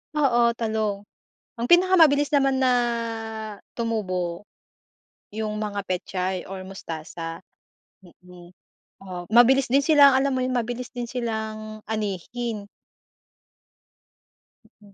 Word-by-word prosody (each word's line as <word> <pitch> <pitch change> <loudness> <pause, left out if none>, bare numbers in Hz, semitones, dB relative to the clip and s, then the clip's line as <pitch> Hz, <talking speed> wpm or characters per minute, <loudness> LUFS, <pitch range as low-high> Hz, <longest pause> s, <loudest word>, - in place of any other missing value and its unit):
Oo, 240 -5 +3
talong. 220 -3 -2 0.6
Ang 235 - -1
pinakamabilis 335 -5 +5
naman 275 -2 +3
na 260 -1 +3 1.1
tumubo, 185 -6 -2 0.9
yung 215 -1 -3
mga 205 -1 -3
pechay 185 0 -2
or 190 0 -6
mustasa, 165 -2 -7 0.6
mm. 180 0 -16 0.5
Oh, 180 -2 -7
mabilis 245 +4 +5
din 275 +3 +3
silang, 285 -3 +6
alam 275 +1 +2
mo 260 - 0
'yon, 255 0 -1
mabilis 245 +1 -2
din 245 -1 -4
silang 220 -3 -4
anihin. 215 +1 -4 2.2
Mm, 200 -1 -18
220 Hz, 100 wpm, -24 LUFS, 190-255 Hz, 2.2 s, silang